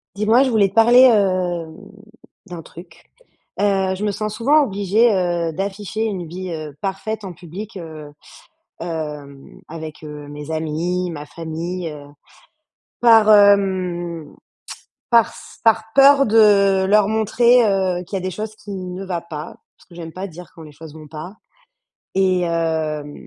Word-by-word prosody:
Dis-moi, 220 +4 +3
je 260 - 0
voulais 210 -4 +3
te 190 - -22
parler, 235 +3 +6
hem, 185 -8 +2 0.7
d'un 175 -3 -8
truc, 170 0 -15 0.6
heu, 195 -2 +1
je 195 - -6
me 210 - 0
sens 215 +1 -4
souvent 290 +6 +3
obligée, 205 +1 +2
heu, 175 -3 -1
d'afficher 200 +4 -4
une 190 -6 -3
vie, 180 +2 -7
heu, 155 -3 -7
parfaite 205 +3 -4
en 190 - -6
public, 185 +5 -9
heu, 155 -4 -9 0.7
hem, 150 -4 -7
avec, 155 -1 -9
heu, 150 -1 -9
mes 145 +1 -9
amis, 165 +3 -2
ma 150 -3 -7
famille, 165 +3 -5
heu, 150 -1 -10 1.0
par, 225 -3 +6
hem, 185 -6 +2 0.8
parce 235 -2 +1
par 225 -1 +3
peur 275 0 +6
de 200 -3 +4
leur 205 0 +4
montrer, 235 +3 +3
heu, 190 -3 0
qu'il 195 - -5
y - - 0
a - - -6
des 185 - -3
choses 215 +4 -6
qui 210 - -13
ne 185 -1 -6
va 180 -3 -3
pas 160 -2 -8 0.2
parce - - -24
que - - -15
j'aime 165 -1 -8
pas 185 +4 -6
dire 180 -1 -12
quand 165 - -12
les 155 -1 -12
choses 155 +1 -12
vont 155 -1 -12
pas 160 +6 -9 0.8
et 185 -1 +2
hem 160 -3 -2
185 Hz, 155 wpm, -20 LUFS, 165-210 Hz, 1.0 s, parler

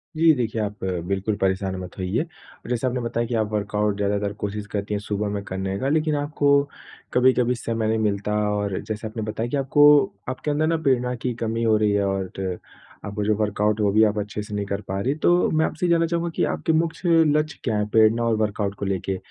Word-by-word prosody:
जी 160 0 +5
देखिए 115 -3 -1
आप 105 -1 -5 0.2
बिल्कुल 100 +2 -1
परेशान 95 0 0
मत 90 -1 -9
होइए। 95 - -1 0.4
जैसा 125 +1 -1
आपने 125 0 -1
बताया 115 0 -2
कि 120 - -4
आप 110 -1 0
वर्कआउट 105 0 -1
ज़्यादातर 100 0 -1
कोशिश 105 0 -3
करती 105 0 -3
हैं 100 - 0
सुबह 105 0 -2
में 100 -1 -3
करने 95 0 -3
का 135 - 0
लेकिन 155 0 +1
आपको 145 0 -1 0.7
कभी-कभी 125 -1 +3
समय 115 -2 -2
नहीं 110 - +1
मिलता 105 -1 -1 0.2
और 105 -2 -1
जैसे 110 0 -5
आपने 110 0 -5
बताया 110 +2 -3
कि 145 - -1
आपको 140 +2 +4 0.4
आपके 130 +3 -3
अंदर 155 +2 +1
न 165 -1 0
प्रेरणा 125 -3 +2
की 125 - -1
कमी 115 +1 -1
हो 110 -1 +4
रही 105 -1 +2
है 100 -1 +1
और 95 -1 -1 0.8
आपका 105 0 -3
जो 105 +1 +2
वर्कआउट 105 0 0
है 105 - +2
वो 100 - +3
भी 110 - +5
आप 105 0 +2
अच्छे 105 0 -4
से 105 - -9
नहीं 100 -1 -2
कर 100 +1 -3
पा 95 +1 -2
रही 125 - -1
हैं। 150 - -4
तो 175 0 +4
मैं 160 0 +2
आपसे - - -2
ये - - +1
जानना 165 0 +4
चाहूँगा 170 +1 -1
कि - - +1
आपके 160 - 0
मुख्य 165 +1 +2
लक्ष्य 150 0 -1
क्या 110 -4 0
हैं 105 0 0
प्रेरणा 110 +2 +4
और 115 -1 +2
वर्कआउट 105 -2 -1
को 100 - -5
लेके? 95 0 -2
110 Hz, 230 wpm, -23 LUFS, 100-130 Hz, 0.8 s, जी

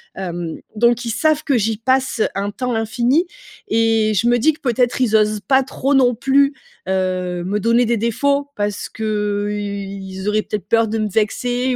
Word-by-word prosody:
Hem, 175 -3 -5 0.2
donc 240 +2 +2
ils 230 - -2
savent 310 +6 +1
que 275 -5 +1
j'y 220 0 0
passe 260 0 0
un 200 +1 -2
temps 250 +4 -3
infini, 240 +8 +1 0.4
et 225 -1 +2
je 220 +4 +1
me 240 0 +4
dis 315 +7 +4
que - - -16
peut-être 245 -2 +1
ils 225 -4 +2
osent 215 0 +2
pas 265 -1 +4
trop 270 +1 -2
non 255 -2 +4
plus, 275 +3 +3 0.4
heu, 185 -2 -1
me 205 +3 -1
donner 230 +3 +3
des 235 +1 +1
défauts 280 +6 0
parce 205 0 -2
qu'ils 205 -2 -3
auraient 210 +1 +2
peut-être 210 -2 -5
peur 225 -1 +3
de 225 - -1
me 215 -1 0
vexer 245 +5 0
225 Hz, 180 wpm, -19 LUFS, 205-250 Hz, 0.4 s, me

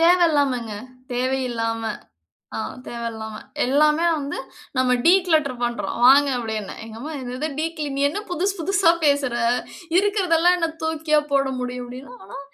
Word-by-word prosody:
தேவையில்லாமங்க. 290 -9 +3 0.4
தேவையில்லாம. 245 -3 -1 0.8
ஆ. - - -2 0.3
தேவையில்லாம. 225 -2 -5 0.3
"எல்லாமே 300 +5 +3
வந்து 285 0 -4 0.4
நம்ம 255 -1 +3
டீக்ளேட்டர் 320 -8 +3
பண்ணுறோம் 240 0 -2
வாங்க." 280 +3 +7
அப்படீன்னேன். 220 -4 -4
எங்க 225 0 -10
அம்மா, 300 +6 -6
"என்னது 255 +4 -3
டீக்ளீன் 310 -3 -3
நீ 280 - 0
என்ன 370 - -4
புதுசு 380 +4 0
புதுசா 390 0 +3
பேசற. 280 -4 +2 0.6
இருக்கிறதெல்லாம் 365 -4 +3
என்ன 335 -2 0
தூக்கியா 320 -1 +2
போட 275 -1 +3
முடியும்?" 250 0 -4
அப்படீன்னா. 250 -3 -10
280 Hz, 125 wpm, -22 LUFS, 245-330 Hz, 0.8 s, வாங்க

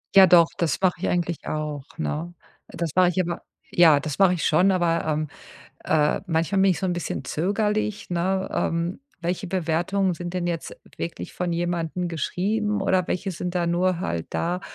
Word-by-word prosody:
Ja 195 -1 +10
doch, 170 -2 +7
das 165 -5 0
mache 185 -2 +3
ich - - 0
eigentlich 175 -2 -1
auch, 150 -2 -3
ne? 165 +2 -3 0.3
Äh, - - -12
das 170 -2 -2
mache 180 -1 +5
ich 180 - -2
aber 170 -1 -3 0.3
ja, 160 -4 +6
das 150 -1 -4
mache 195 -2 +5
ich 170 -4 -2
schon, 180 +5 +4
aber, 170 -3 +1
ähm, 155 0 0 0.6
äh, 150 -1 +2
manchmal 165 +3 +1
bin 195 0 +5
ich 180 - 0
so - - -3
'n 180 - 0
bisschen 175 -5 -4
zögerlich, 210 +6 -1
ne? 190 +2 0
Ähm. 170 +5 -1 0.2
Welche 180 +3 -2
Bewertungen 180 +2 0
sind 175 +1 -6
denn 180 -1 -2
jetzt 170 -2 -3 0.2
wirklich 170 - -6
von 180 -1 -2
jemandem 175 0 -2
geschrieben 210 +6 -1
oder 185 -2 +2
welche 190 +2 -2
sind 175 +1 -4
da 175 -1 +1
nur 175 +1 +1
halt 85 - -2
da, 175 +2 -1
175 Hz, 185 wpm, -24 LUFS, 165-185 Hz, 0.6 s, Ja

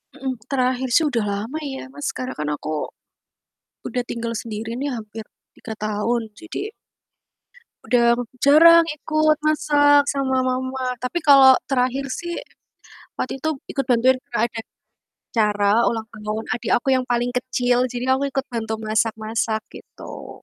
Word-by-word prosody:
Mhm. 265 -1 -3 0.2
Terakhir 255 -1 0
sih 325 - +5
udah 235 -6 0
lama 220 +10 -4
ya, 265 - -6
Mas, 290 - -7
sekarang 255 0 -5
kan 150 - -2
aku, 155 +1 -5 1.2
udah 250 - -2
tinggal 230 0 -3
sendiri 220 0 -6
nih 285 - -1
hampir 220 0 -8 0.3
3 225 - -8
tahun 215 +2 -1
jadi 370 - -6 1.1
udah 240 -1 +3 0.4
jarang 335 +3 +8
ikut 310 0 +2
masak 290 -1 +4
sama 270 -2 0
mama, 260 0 -2 0.2
tapi 300 +8 -1
kalau 275 -3 +8 0.2
terakhir 260 +1 0
sih 345 0 -5 0.8
waktu 260 - -3
itu 315 - -1 0.2
ikut 275 - -2
bantuin 250 +2 +4
kalau 235 -2 -1
ada 230 -1 -7 0.7
acara 210 -3 +2 0.2
ulang 225 -1 -1
tahun 215 0 -5
adik 240 - -3
aku 240 - -3
yang 255 - -1
paling 240 0 +1
kecil. 250 0 +1
Jadi 245 0 -5
aku 265 +1 +2
ikut 270 0 -1
bantu 225 -2 -3
masak-masak 220 0 -1
gitu. - - -11
250 Hz, 140 wpm, -22 LUFS, 225-275 Hz, 1.2 s, jarang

